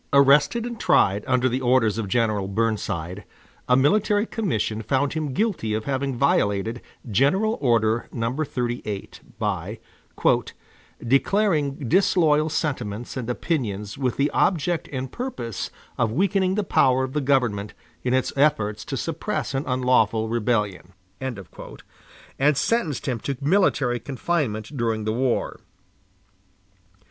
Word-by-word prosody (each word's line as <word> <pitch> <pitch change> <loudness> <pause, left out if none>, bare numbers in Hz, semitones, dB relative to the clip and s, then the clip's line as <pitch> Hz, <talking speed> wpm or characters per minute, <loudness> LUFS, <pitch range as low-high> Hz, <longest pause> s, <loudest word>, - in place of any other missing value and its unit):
Arrested 140 - +4
and 235 -2 -6
tried 105 - +3
under 130 -1 +2
the 130 +1 -1
orders 120 -4 +2
of 110 - -2
General 105 -2 +1
Burnside, 100 -4 -2 0.5
a 125 - +6
military 205 +8 +3
commission 115 - -2
found 135 +5 0
him 155 -3 -2
guilty 160 - -1
of 110 - -3
having 135 -1 -1
violated 115 -3 +1 0.3
General 165 - +2
Order 115 -3 +2
No. 115 +2 -2
38, 120 -8 -4 0.2
by - - -2 1.3
"declaring 145 - +1
disloyal 160 - +3
sentiments 120 -8 -3
and 125 -3 -4
opinions 105 - -2
with 130 -3 -2
the 140 +2 +1
object 175 -1 +1
and 130 -2 -4
purpose 130 - -4 0.3
of 110 - +2
weakening 190 - +1
the 210 - 0
power 130 -7 +3
of 130 0 -4
the 150 - 0
government 125 -7 0 0.3
in 125 0 +1
its 130 - 0
efforts 135 -8 +1
to - - -4
suppress - - -3
an 135 +2 -1
unlawful 125 -4 +2
rebellion"; 105 -6 -1 0.3
and 125 -7 -5 1.1
sentenced 165 - 0
him 125 -3 -1
to 135 +3 -4
military 145 -6 +2
confinement 135 -4 -2
during 115 -3 -1
the 110 - 0
war. 125 +1 -1
130 Hz, 125 wpm, -24 LUFS, 110-150 Hz, 1.3 s, a